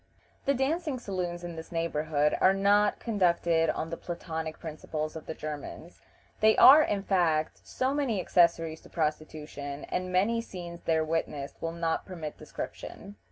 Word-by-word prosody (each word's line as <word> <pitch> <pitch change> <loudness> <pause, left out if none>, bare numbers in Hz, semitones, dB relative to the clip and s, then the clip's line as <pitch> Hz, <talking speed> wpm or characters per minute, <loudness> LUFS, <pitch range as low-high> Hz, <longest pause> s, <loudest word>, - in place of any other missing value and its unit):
The 280 - +3
dancing 295 +2 0
saloons 180 -6 -4
in 175 -1 -6
this 160 - -8
neighborhood 155 -3 0
are 190 +1 +5
not 205 +1 +3
conducted 170 -6 +2
on 160 - -2
the 165 - -3
platonic 160 -2 -5
principles 155 -1 -5
of 160 - -8
the 160 - -4
Germans. 155 +3 -7 0.4
They 220 0 +5
are, 290 +4 +10
in 205 -9 0
fact, 165 -6 +1
so 260 +1 0
many 270 -8 0
accessories 165 -3 +2
to - - -16
prostitution, 150 -2 -4
and 185 0 -2
many 210 +6 +2
scenes 175 -5 -8
there 160 -1 +2
witnessed 155 -3 -3
will 165 - -2
not 165 -1 -2
permit 165 -5 -6
description. 200 0 -8
170 Hz, 155 wpm, -29 LUFS, 160-200 Hz, 0.4 s, are